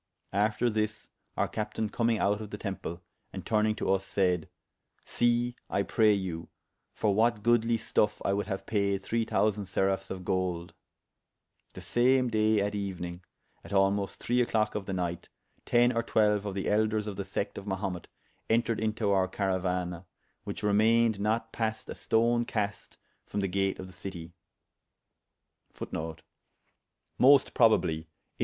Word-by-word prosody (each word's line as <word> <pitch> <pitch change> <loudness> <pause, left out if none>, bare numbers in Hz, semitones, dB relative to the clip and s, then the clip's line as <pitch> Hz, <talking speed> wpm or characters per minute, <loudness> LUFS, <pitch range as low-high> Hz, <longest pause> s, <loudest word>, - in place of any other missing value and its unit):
After 105 +4 +2
this 110 -1 -2 0.3
our - - +2
captayne 110 0 -3
commyng 115 -1 +1
out 105 +1 +1
of 105 - -7
the 105 - -6
temple, 95 -4 -5 0.3
and - - -7
turnyng 110 -1 +1
to - - -3
vs, 95 0 +2
sayd, 90 -3 0 0.6
See 120 0 +1
(I 100 - +1
pray 110 +1 +3
you) 90 -4 -3 0.4
for 105 -2 0
what 110 0 +2
goodly 120 0 +3
stuffe 105 -1 +1
I 100 - +2
would 100 +1 -1
haue 95 -2 -4
paide 100 -2 0
three 115 +1 -1
thousande 105 -3 +1
seraphes 95 +1 0
of 95 -1 -6
golde. 90 -2 -1 1.0
The - - -9
same 125 +1 +3
daye 110 -1 +3
at 100 +1 -1
euenyng, 90 -3 -4 0.4
at - - -12
almost 100 0 +1
three 125 +1 +1
a 120 - +1
clock 110 -1 +1
of 105 -2 -4
the 95 - -2
nyght, 90 -2 -3 0.4
ten 120 +1 +4
or 115 - +2
twelue 105 -2 +2
of 100 - -4
the 95 - -2
elders 110 0 +1
of 105 -2 -5
the - - -3
secte 100 +1 -3
of 100 - -12
Mahumet 95 -2 -3 0.4
entered 115 0 +2
into 110 -1 0
our 95 -1 +3
carauana, 90 -2 -2 0.4
which - - -5
remayned 110 +1 +3
not 110 +2 -1
paste 110 -1 -2
a - - -3
stone 120 +1 +2
caste 105 -3 -3 0.3
from 105 - -4
the 100 - 0
gate 95 +1 0
of 95 - -7
the 95 - -12
citie. 85 -4 -8
105 Hz, 150 wpm, -29 LUFS, 95-110 Hz, 1.0 s, ten